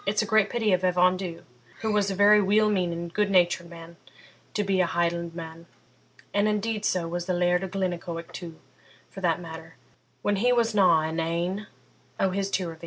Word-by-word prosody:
It's 210 +2 +1
a - - -3
great 220 -2 +3
pity 220 -4 +1
of 185 0 +1
Evan 180 0 +3
Dhu, 180 -3 -6 0.4
who 220 -1 -1
was 205 -1 +1
a 195 - -2
very 205 +2 +6
weel 210 +2 +3
meaning, 170 -3 -2
good 210 -1 +1
natured 175 -2 +2
man, 170 0 -12 0.6
to 210 - +1
be 195 -2 +1
a 180 - +2
Hielandman; 170 -1 -3 0.7
and 205 +1 +2
indeed 215 0 -1
so 180 -5 0
was 175 +1 -4
the 185 - 0
Laird 180 +1 +2
o' - - -2
Glennaquoich 175 -3 -4
too, 170 -3 -8 0.5
for 195 - -9
that 170 -2 +1
matter, 160 -1 -10 0.5
when 205 -1 +1
he 245 +5 +2
wasna 210 -9 +4
in 160 +1 -3
ane 175 +5 -2 0.5
o' 190 - +2
his 195 +1 -2
tirrivies.' 170 -5 -3
185 Hz, 185 wpm, -26 LUFS, 170-205 Hz, 0.7 s, very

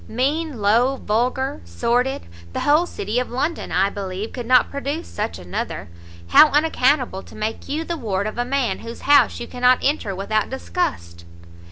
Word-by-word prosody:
mean, 280 +3 -1
low, 230 +6 +3
vulgar, 255 +5 -1
sordid! 245 +3 0 0.3
the - - -2
whole 305 +4 +3
city 215 - -2
of 250 - -3
London, 290 +7 -2
I 195 +2 +2
believe, 195 +2 -5
could 245 -3 -6
not 255 0 +4
produce 285 +4 -4
such 85 - -4
another! 90 -1 -5 0.4
how 310 - +8
unaccountable 280 -8 +2
to - - -15
make 215 +1 -4
you 305 +3 -1
the 340 0 -4
ward 200 -7 -2
of 215 +2 -4
a - - +2
man 260 0 -1
whose 230 0 -9
house 290 +1 +4
you 240 - -5
cannot 250 +1 +3
enter 265 -9 0
without 215 +3 -1
disgust!" 85 - -3
250 Hz, 170 wpm, -21 LUFS, 210-280 Hz, 0.4 s, how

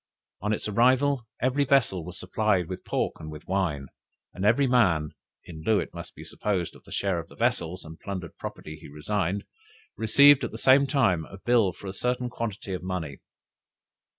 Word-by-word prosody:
On 105 +2 -1
its 110 - -2
arrival 130 +3 +3 0.2
every 130 +3 +2
vessel 130 -10 +2
was 90 0 -8
supplied 95 -1 +1
with 90 +1 -6
pork - - -2
and 80 - -8
with 75 0 -10
wine, 85 -7 -1 0.5
and 95 - -5
every 115 +7 +4
man 95 - +3 0.3
(in 80 -3 -9
lieu 110 +2 +3
it - - -5
may - - -5
be - - -10
supposed, 95 -5 -2
of - - -16
his - - -7
share 95 -3 0
of 85 - -7
the - - -16
vessels, 85 +2 -1
and 80 0 -11
plundered 95 -4 -6
property 75 +1 -7
he - - -10
resigned) 95 +6 -2 0.5
received 140 +6 +6
at - - -1
the - - -8
same 135 +2 +5
time 95 - +2
a 95 - -11
bill 115 -2 +3
for 100 - -14
a 95 - -4
certain 125 +3 -1
quantity 105 -5 -4
of 90 - -3
money. 90 -6 -4
100 Hz, 190 wpm, -27 LUFS, 85-120 Hz, 0.5 s, received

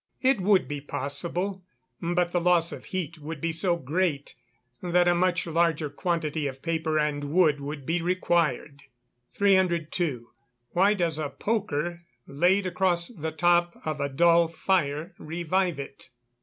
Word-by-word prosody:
_ - - -67 0.2
It 260 -5 +2
would 195 0 +3
be 145 -1 -5
possible; 170 +8 -3 0.4
but 175 0 0
the 175 - +1
loss 170 -1 +3
of - - -8
heat 170 -3 -4
would 155 +1 -6
be 165 +3 -1
so 170 +1 +1
great, 155 0 -1 0.5
that 175 0 +2
a 175 - +5
much 180 0 +1
larger 165 -3 +1
quantity 155 -2 -1
of 135 -1 -8
paper 160 -2 -1
and 150 -1 0
wood 155 -1 +3
would 140 -1 -6
be 165 +3 0
required. 165 -5 0 0.5
302. 170 -9 +1 0.4
_Why 200 +4 +4
does 165 -4 0
a 150 -2 -2
poker 175 -6 -2 0.2
laid 180 +7 +2
across 180 -1 +1
the 160 -9 -5
top 175 +2 +2
of 155 -2 -2
a 140 - -1
dull 170 +4 +4
fire 165 -1 -1
revive 175 +1 -1
it? 135 -1 -9
170 Hz, 150 wpm, -26 LUFS, 150-180 Hz, 0.5 s, a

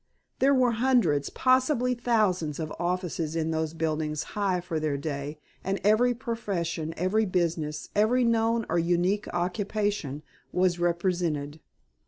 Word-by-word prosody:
There 275 +1 +4
were 250 -2 +4
hundreds, 215 - +3
possibly 255 -1 +2
thousands, 210 - +1
of 155 -1 -4
offices 175 -2 -2
in 160 0 0
those 160 0 -2
buildings 155 -1 -1
high 195 -3 +1
for 175 -2 -3
their 155 -2 -1
day, 145 0 -4 0.3
and 195 +1 -1
every 235 +4 +4
profession, 185 -10 -3
every 205 +5 +1
business, 160 -4 -1
every 225 +5 +3
known 230 -1 +2
or - - +1
unique 175 +4 +1
occupation, 185 -4 -2 0.3
was 180 -1 +1
represented. 170 -4 -1
180 Hz, 130 wpm, -27 LUFS, 160-220 Hz, 0.3 s, There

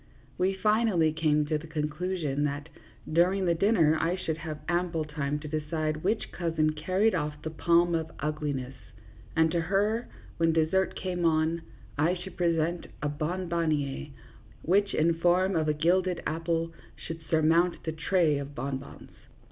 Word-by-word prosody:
We 190 +1 +1
finally 210 -6 +2
came 155 -2 +2
to 155 0 0
the 165 - -10
conclusion 155 -1 -2
that 145 +2 -3 0.4
during 185 +3 +3
the 170 - +3
dinner 165 -4 +3
I 170 +2 +1
should 165 -4 -3
have 155 -2 -6
ample 175 -2 0
time 150 -1 -2
to 155 - -7
decide 155 0 -2
which 215 +4 0
cousin 160 -3 0
carried 185 +8 +1
off 150 -3 -2
the 160 - -4
palm 170 +2 +3
of 160 -1 -1
ugliness, 145 -3 -2 0.6
and 160 0 +4
to 170 0 +1
her, 205 +7 +1 0.3
when 165 -1 +3
dessert 165 +4 +2
came 180 -2 -3
on, 160 0 +2 0.4
I 165 +5 +3
should 185 +1 -9
present 170 0 0 0.2
a 150 - +1
bonbon 170 +2 -1
niere, 145 -2 -1 0.6
which, 200 +4 +2
in 165 +1 +2
form 180 +3 +3
of 155 -1 +1
a 150 - +3
gilded 180 +3 +1
apple, 165 +1 -1 0.2
should 165 0 -7
surmount 165 +2 +3
the 160 - -2
tray 160 -2 +2
of 140 0 -7
bonbons. 135 +1 -6
165 Hz, 155 wpm, -28 LUFS, 155-180 Hz, 0.6 s, and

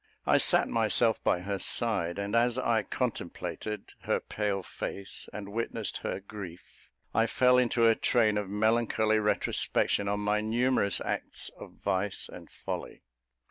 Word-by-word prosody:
I - - +4
sat - - +4
myself 115 0 +2
by 90 - +2
her 100 +1 -3
side; 100 -9 0
and 100 +2 -2
as 120 +1 +3
I 115 -3 +2
contemplated 105 +1 -4
her - - 0
pale 100 -2 -2
face 100 +2 -6
and 100 -1 -7
witnessed 115 +2 -2
her - - -3
grief, 95 -3 -11 0.2
I 115 +1 +3
fell 125 +1 +4
into 120 -1 +3
a 115 - +6
train 110 -2 +2
of 100 -2 -5
melancholy 110 +1 +2
retrospection 105 -1 +1
on 105 +1 0
my 105 +1 +1
numerous 115 -1 +1
acts - - -3
of - - -12
vice 95 +2 -2
and - - -11
folly. - - -6
105 Hz, 145 wpm, -29 LUFS, 100-115 Hz, 0.2 s, a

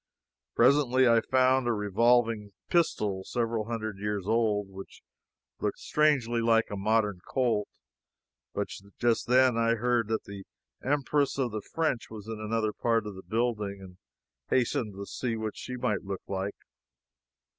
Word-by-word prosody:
Presently 130 0 +4
I 115 -1 +5
found 130 0 +3
a 120 - +2
revolving 110 0 +2 0.2
pistol 105 - +1
several 115 0 -1
hundred 110 -3 -4
years 105 -2 -2
old 105 -2 +1
which 95 0 -11 0.6
looked - - -1
strangely 135 -6 +2
like 115 -1 +3
a - - -2
modern 105 -1 +1
Colt, 120 -6 0 0.9
but 100 - -1 0.3
just 120 -2 +1
then 125 -1 +4
I 115 0 +3
heard 120 -1 +1
that 110 0 -1
the 100 -1 -9 0.4
Empress 145 0 +1
of 130 -4 0
the 110 0 -4
French 155 -1 -2
was 110 -2 -9
in 110 -1 -5
another 110 0 -1
part 115 -2 +1
of 105 - -5
the 95 - -10
building, 110 -3 -2
and 95 -2 -12 0.5
hastened 120 -4 0
away 100 - -6
to - - -7
see 120 +3 -3
what 110 -1 -4
she 125 - -6
might 120 -5 0
look 95 -1 -5
like. 95 +1 -3
115 Hz, 155 wpm, -29 LUFS, 105-125 Hz, 0.9 s, I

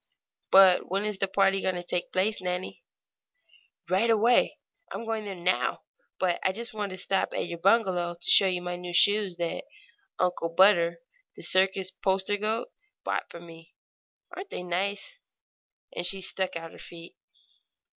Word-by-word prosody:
"But 190 -2 +6
when 195 +3 -1
is 210 -2 -3
the 195 - +1
party 195 0 +2
going 185 - 0
to 175 - -4
take 175 0 -3
place, 195 +2 0
Nannie?" 180 - -4 1.0
"Right 195 +6 +1
away 230 +2 +3 0.3
I'm 230 - -6
going 225 -1 -3
there 195 -2 -5
now; 180 +1 0 0.4
but 180 -2 0
I 190 - +1
just 230 +3 -6 0.3
stopped 195 +1 -1
at - - -1
your 170 -1 -7
bungalow 185 -3 +2
to 170 - -4
show 195 - +6
you 180 -1 -1
my 175 0 -4
new 175 0 -7
shoes 205 -2 +3
that 170 -1 -3 0.5
Uncle 180 -2 -1
Butter, 170 +1 +4 0.3
the - - -7
circus 190 0 +2
poster 190 +2 0
goat, 220 - -2 0.3
bought - - -3
for 170 - -10
me. 165 0 -15 0.6
Aren't 380 +2 -8
they - - -5
nice?" 200 - -3 0.8
And - - -2
she 190 +2 -2
stuck 190 -1 -1
out 165 -1 -6
her - - -14
feet. 170 0 -12
190 Hz, 160 wpm, -27 LUFS, 175-205 Hz, 1.0 s, But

